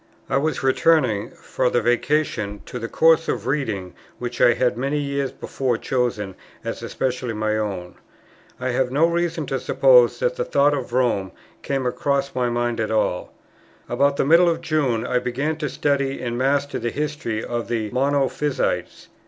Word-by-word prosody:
I -, -, +3 dB
was 155 Hz, +1 st, -1 dB
returning, 135 Hz, -6 st, +2 dB
for -, -, -2 dB
the 120 Hz, -, +2 dB
Vacation, 120 Hz, -5 st, 0 dB
to 125 Hz, -, -6 dB
the 115 Hz, -, -4 dB
course 165 Hz, +5 st, +4 dB
of -, -, -2 dB
reading 110 Hz, -10 st, -2 dB, 0.2 s
which 120 Hz, 0 st, -5 dB
I 120 Hz, -, +6 dB
had 125 Hz, -1 st, +1 dB
many 135 Hz, +4 st, -1 dB
years 140 Hz, -1 st, -2 dB
before 130 Hz, -3 st, -2 dB
chosen 120 Hz, -7 st, -1 dB, 0.3 s
as -, -, -4 dB
especially 125 Hz, -3 st, -2 dB
my 110 Hz, 0 st, 0 dB
own. 95 Hz, -5 st, -3 dB, 0.7 s
I 130 Hz, 0 st, -2 dB
have 125 Hz, 0 st, +1 dB
no 145 Hz, +5 st, +4 dB
reason 170 Hz, 0 st, -1 dB
to -, -, -2 dB
suppose -, -, +5 dB
that -, -, -1 dB
the 485 Hz, -, 0 dB
thoughts 145 Hz, -, +3 dB
of 130 Hz, -4 st, -5 dB
Rome 120 Hz, -7 st, 0 dB, 0.3 s
came 135 Hz, -2 st, -2 dB
across 140 Hz, +2 st, 0 dB
my 125 Hz, -1 st, 0 dB
mind 120 Hz, 0 st, -1 dB
at 110 Hz, -, -1 dB
all. 110 Hz, -5 st, 0 dB, 0.6 s
About 140 Hz, 0 st, +1 dB
the -, -, +2 dB
middle 170 Hz, +4 st, +6 dB
of 165 Hz, 0 st, -1 dB
June 145 Hz, -9 st, 0 dB
I 125 Hz, -, +1 dB
began 130 Hz, +6 st, -2 dB
to 150 Hz, -2 st, -3 dB
study 140 Hz, 0 st, 0 dB
and 120 Hz, -1 st, -3 dB
master 140 Hz, +3 st, 0 dB
the 120 Hz, -, -2 dB
history 145 Hz, -6 st, -3 dB
of 120 Hz, -1 st, -3 dB
the 110 Hz, -3 st, -2 dB
Monophysites. 140 Hz, +2 st, -1 dB
130 Hz, 170 wpm, -22 LUFS, 120-145 Hz, 0.7 s, I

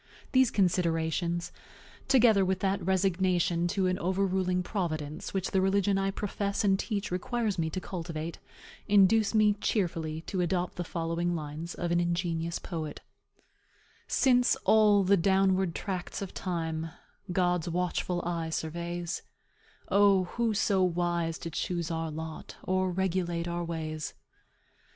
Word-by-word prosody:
These 260 Hz, -2 st, +5 dB
considerations, 170 Hz, -2 st, 0 dB, 0.6 s
together 235 Hz, -7 st, +5 dB
with 190 Hz, 0 st, 0 dB
that 195 Hz, -1 st, 0 dB
resignation 180 Hz, -2 st, +1 dB
to 190 Hz, +1 st, 0 dB
an 185 Hz, 0 st, 0 dB
overruling 185 Hz, 0 st, 0 dB
Providence 155 Hz, -7 st, -3 dB
which 190 Hz, -1 st, -2 dB
the 190 Hz, -, +2 dB
religion 195 Hz, +1 st, +2 dB
I 195 Hz, 0 st, +1 dB
profess 200 Hz, +1 st, -2 dB
and 195 Hz, -1 st, +3 dB
teach 205 Hz, -4 st, -3 dB
requires 210 Hz, +2 st, -1 dB
me 160 Hz, -1 st, 0 dB
to 185 Hz, -, -3 dB
cultivate, 165 Hz, -3 st, -5 dB, 0.5 s
induce 205 Hz, +2 st, +4 dB
me 210 Hz, -1 st, +5 dB
cheerfully 165 Hz, -6 st, -1 dB
to 185 Hz, +2 st, -3 dB
adopt 180 Hz, 0 st, -1 dB
the 175 Hz, -, -1 dB
following 170 Hz, +1 st, -2 dB
lines 155 Hz, +2 st, -5 dB
of 175 Hz, -1 st, -2 dB
an 175 Hz, -, +3 dB
ingenious 170 Hz, -1 st, -1 dB
poet: 160 Hz, -4 st, -5 dB, 1.1 s
"Since 250 Hz, -2 st, +3 dB
all 210 Hz, -2 st, +5 dB
the 200 Hz, +2 st, +4 dB
downward 190 Hz, -1 st, +2 dB
tracts 185 Hz, -3 st, -4 dB
of 195 Hz, -, -7 dB
time 165 Hz, -3 st, -3 dB, 0.4 s
God's 180 Hz, -1 st, +1 dB
watchful 180 Hz, 0 st, -1 dB
eye 170 Hz, -2 st, -2 dB
surveys, 170 Hz, +2 st, -3 dB, 0.7 s
O, 200 Hz, -2 st, +5 dB
who 225 Hz, +4 st, -1 dB
so 195 Hz, -1 st, +2 dB
wise 175 Hz, -2 st, 0 dB
to 165 Hz, -, -6 dB
choose 170 Hz, +1 st, -2 dB
our 165 Hz, 0 st, -2 dB
lot, 160 Hz, +1 st, -7 dB
Or 185 Hz, 0 st, +1 dB
regulate 175 Hz, -2 st, -1 dB
our 175 Hz, 0 st, -2 dB
ways? 155 Hz, -2 st, -4 dB
180 Hz, 135 wpm, -29 LUFS, 170-195 Hz, 1.1 s, These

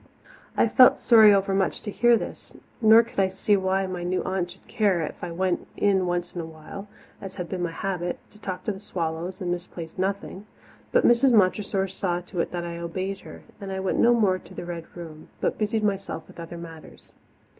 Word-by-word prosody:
I -, -, +4 dB
felt 250 Hz, +3 st, +7 dB
sorry 220 Hz, -3 st, +7 dB
overmuch 195 Hz, -1 st, +1 dB
to 210 Hz, -, -4 dB
hear 240 Hz, +2 st, +4 dB
this, -, -, -8 dB, 0.3 s
nor 220 Hz, +1 st, +8 dB
could 230 Hz, -, -6 dB
I 195 Hz, -, +4 dB
see 190 Hz, +2 st, +1 dB
why 190 Hz, 0 st, +1 dB
my 185 Hz, -1 st, -4 dB
new 180 Hz, +1 st, -1 dB
aunt 185 Hz, -2 st, -2 dB
should -, -, -15 dB
care 200 Hz, -6 st, +1 dB
if 155 Hz, -, -6 dB
I -, -, -4 dB
went 180 Hz, +1 st, -1 dB
in 190 Hz, -3 st, +2 dB
once 175 Hz, 0 st, -2 dB
in 175 Hz, -, -4 dB
a -, -, -6 dB
while, 160 Hz, +5 st, -10 dB, 0.3 s
as 195 Hz, -1 st, -8 dB
had 180 Hz, -, -5 dB
been 185 Hz, +1 st, -4 dB
my 175 Hz, -, 0 dB
habit, 175 Hz, 0 st, -3 dB
to 210 Hz, -, -18 dB
talk 185 Hz, -3 st, -5 dB
to -, -, -1 dB
the 190 Hz, -, -7 dB
swallows 175 Hz, -1 st, -4 dB
and 180 Hz, -2 st, -2 dB
misplace 175 Hz, -1 st, -6 dB
nothing. 195 Hz, +1 st, -3 dB, 0.4 s
But -, -, +3 dB
Mrs. 240 Hz, +2 st, +5 dB
Montressor 195 Hz, -1 st, +2 dB
saw 180 Hz, -2 st, -2 dB
to 180 Hz, 0 st, -7 dB
it -, -, 0 dB
that 175 Hz, -1 st, -4 dB
I 170 Hz, 0 st, -5 dB
obeyed 185 Hz, +3 st, -4 dB
her, -, -, -12 dB, 0.2 s
and 195 Hz, -1 st, -6 dB
I 190 Hz, -, -3 dB
went 190 Hz, 0 st, -1 dB
no 240 Hz, +1 st, +5 dB
more 195 Hz, -5 st, +2 dB
to -, -, -15 dB
the -, -, -6 dB
Red 170 Hz, -1 st, -6 dB
Room, 160 Hz, -3 st, -10 dB
but -, -, -1 dB
busied 215 Hz, 0 st, 0 dB
myself 195 Hz, -5 st, -2 dB
with -, -, -14 dB
other 170 Hz, +1 st, -7 dB
matters. 165 Hz, -2 st, -11 dB
190 Hz, 215 wpm, -25 LUFS, 175-200 Hz, 0.4 s, nor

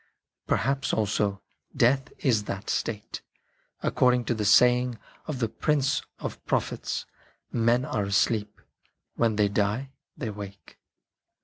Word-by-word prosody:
Perhaps 135 Hz, 0 st, +1 dB
also 105 Hz, -1 st, 0 dB, 0.3 s
Death 135 Hz, +4 st, +3 dB
is 110 Hz, -6 st, +3 dB
that 95 Hz, +2 st, -4 dB
state, 105 Hz, -2 st, -3 dB, 0.6 s
according 125 Hz, -1 st, +3 dB
to -, -, +1 dB
that 110 Hz, -2 st, -2 dB
saying 125 Hz, +2 st, +5 dB, 0.3 s
of 150 Hz, -, -3 dB
the 115 Hz, -2 st, 0 dB
Prince 140 Hz, +3 st, +1 dB, 0.2 s
of -, -, -6 dB
pro -, -, +4 dB
phets: -, -, -4 dB, 0.2 s
" -, -, -39 dB
Men 120 Hz, +2 st, +2 dB
are 105 Hz, -, -1 dB
asleep; 105 Hz, +2 st, +1 dB, 0.5 s
when 115 Hz, -2 st, +1 dB
they 105 Hz, -1 st, +3 dB
die, 105 Hz, +6 st, 0 dB, 0.3 s
they 115 Hz, -, -3 dB
wake." 100 Hz, -3 st, -10 dB
115 Hz, 130 wpm, -27 LUFS, 105-125 Hz, 0.6 s, saying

